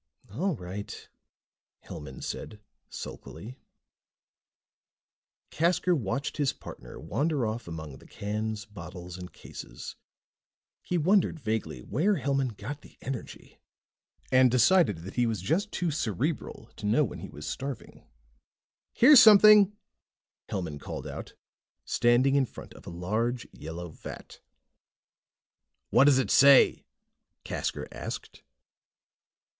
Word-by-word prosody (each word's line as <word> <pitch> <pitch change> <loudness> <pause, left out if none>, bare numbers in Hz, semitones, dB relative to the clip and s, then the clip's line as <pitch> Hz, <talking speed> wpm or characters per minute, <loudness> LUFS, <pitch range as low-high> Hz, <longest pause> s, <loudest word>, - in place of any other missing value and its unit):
"All 175 - -1
right," 95 0 -8 0.8
Hellman 75 -5 -9
said 105 - -6 0.3
sulkily. 120 +6 -9 1.9
Casker 175 +2 +2
watched 135 +2 -3
his 145 -3 +1
partner - - -11
wander 150 -4 -1
off 110 0 -4
among 80 -4 -7
the - - -17
cans, 105 0 -4
bottles 90 -3 -9
and 90 0 -8
cases. - - -9 0.9
He 180 - -2
wondered 175 0 +2
vaguely 110 - -3
where 175 - +1
Hellman 135 - -1
got 140 +8 -6
the - - -18
energy, 130 -3 -7 0.7
and 130 0 +6
decided 125 - +3
that 95 - -9
he 120 -1 +3
was 110 -3 -1
just 165 - -1
too 175 -2 -1
cerebral 120 - -3
to 105 - -4
know 115 +9 +4
when 125 - -5
he - - -8
was 75 - -9
starving. 135 -3 -6 0.9
"Here's 265 +1 +8
something," 210 -1 +8 0.7
Hellman 85 -7 -4
called - - -7
out, - - -8 0.5
standing 120 +3 +3
in 140 -2 +3
front - - -11
of - - -15
a - - -4
large 110 +8 -2
yellow 85 +2 -7
vat. - - -10 1.5
"What 130 - +6
does 140 -2 +6
it 135 - 0
say?" 140 -1 +6 0.6
Casker - - -3
asked. - - -7
120 Hz, 120 wpm, -28 LUFS, 100-150 Hz, 1.9 s, Here's